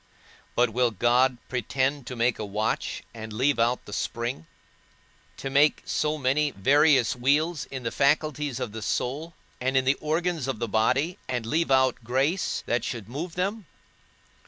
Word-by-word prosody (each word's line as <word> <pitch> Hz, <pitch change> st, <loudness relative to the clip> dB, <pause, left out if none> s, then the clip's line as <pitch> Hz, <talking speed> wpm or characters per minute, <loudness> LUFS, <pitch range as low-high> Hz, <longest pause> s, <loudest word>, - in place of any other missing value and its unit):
But 120 Hz, -1 st, +3 dB
will 125 Hz, +2 st, +2 dB
God 120 Hz, +4 st, +2 dB
pretend 130 Hz, +2 st, -1 dB
to 125 Hz, -, -5 dB
make 120 Hz, 0 st, +1 dB
a -, -, -2 dB
watch, 105 Hz, +2 st, -2 dB
and 110 Hz, -1 st, -8 dB
leave 130 Hz, +5 st, +1 dB
out 120 Hz, +2 st, +1 dB
the 105 Hz, -, -9 dB
spring? 115 Hz, -7 st, -3 dB, 0.9 s
to 135 Hz, -, -5 dB
make 145 Hz, +2 st, +4 dB
so 155 Hz, 0 st, 0 dB
many 145 Hz, +2 st, +1 dB
various 135 Hz, +2 st, +3 dB
wheels 145 Hz, +6 st, +1 dB
in 130 Hz, -2 st, -7 dB
the 115 Hz, -, -2 dB
faculties 145 Hz, -1 st, +1 dB
of 115 Hz, -, -3 dB
the 110 Hz, +1 st, -7 dB
soul, 145 Hz, +9 st, -2 dB, 0.2 s
and 130 Hz, +1 st, 0 dB
in 130 Hz, -, +2 dB
the 135 Hz, +2 st, +2 dB
organs 160 Hz, -2 st, -1 dB
of 135 Hz, -, -2 dB
the 115 Hz, -, -2 dB
body, 130 Hz, -, +1 dB
and 125 Hz, -3 st, -2 dB
leave 160 Hz, +7 st, 0 dB
out 130 Hz, -2 st, +3 dB
grace, 135 Hz, -, 0 dB
that 120 Hz, -1 st, 0 dB
should 115 Hz, -5 st, -5 dB
move 160 Hz, +8 st, -5 dB
them? 195 Hz, +2 st, -2 dB
130 Hz, 165 wpm, -26 LUFS, 120-150 Hz, 0.9 s, make